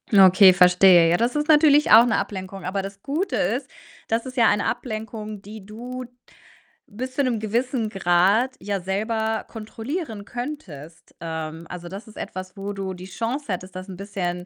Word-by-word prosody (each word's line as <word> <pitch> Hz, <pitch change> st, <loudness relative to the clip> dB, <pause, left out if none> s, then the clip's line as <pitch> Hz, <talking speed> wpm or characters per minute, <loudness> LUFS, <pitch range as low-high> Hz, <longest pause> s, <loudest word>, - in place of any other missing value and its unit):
Na 195 Hz, -3 st, +7 dB
okay, 190 Hz, +1 st, +7 dB
verstehe. 180 Hz, -1 st, +6 dB
Ja, 175 Hz, -, +3 dB
das 235 Hz, +6 st, 0 dB
ist 295 Hz, 0 st, 0 dB
natürlich 300 Hz, -1 st, +5 dB
auch 225 Hz, +2 st, +9 dB
'ne 230 Hz, -, +1 dB
Ablenkung, 190 Hz, -1 st, -5 dB
aber 190 Hz, +2 st, -2 dB
das 195 Hz, 0 st, -9 dB
Gute 310 Hz, -, -2 dB
ist, -, -, -1 dB, 0.4 s
das 225 Hz, +2 st, -1 dB
ist 255 Hz, -1 st, -8 dB
ja 230 Hz, -, +5 dB
eine 205 Hz, -, +1 dB
Ablenkung, 215 Hz, -2 st, -5 dB
die 205 Hz, 0 st, -11 dB
du 245 Hz, +4 st, -7 dB, 0.8 s
bis 255 Hz, +5 st, -6 dB
zu 280 Hz, -, +1 dB
'nem 245 Hz, -4 st, 0 dB
gewissen 230 Hz, +2 st, -1 dB
Grad 195 Hz, +7 st, +2 dB
ja 200 Hz, -1 st, -3 dB
selber 220 Hz, +4 st, -2 dB
kontrollieren 225 Hz, -, -6 dB
könntest. 190 Hz, -, -8 dB
Ähm, 160 Hz, 0 st, -5 dB
also, 175 Hz, -1 st, -8 dB
das 195 Hz, +5 st, -9 dB
ist 220 Hz, -, -15 dB
etwas, 185 Hz, +2 st, -7 dB
wo 200 Hz, +1 st, -5 dB
du 195 Hz, -1 st, -4 dB
die 180 Hz, 0 st, -10 dB
Chance 230 Hz, +9 st, -4 dB
hättest, 185 Hz, +1 st, -7 dB
das 185 Hz, +1 st, -7 dB
'n 190 Hz, -2 st, -9 dB
bisschen 180 Hz, -3 st, -4 dB
205 Hz, 180 wpm, -23 LUFS, 185-235 Hz, 0.8 s, auch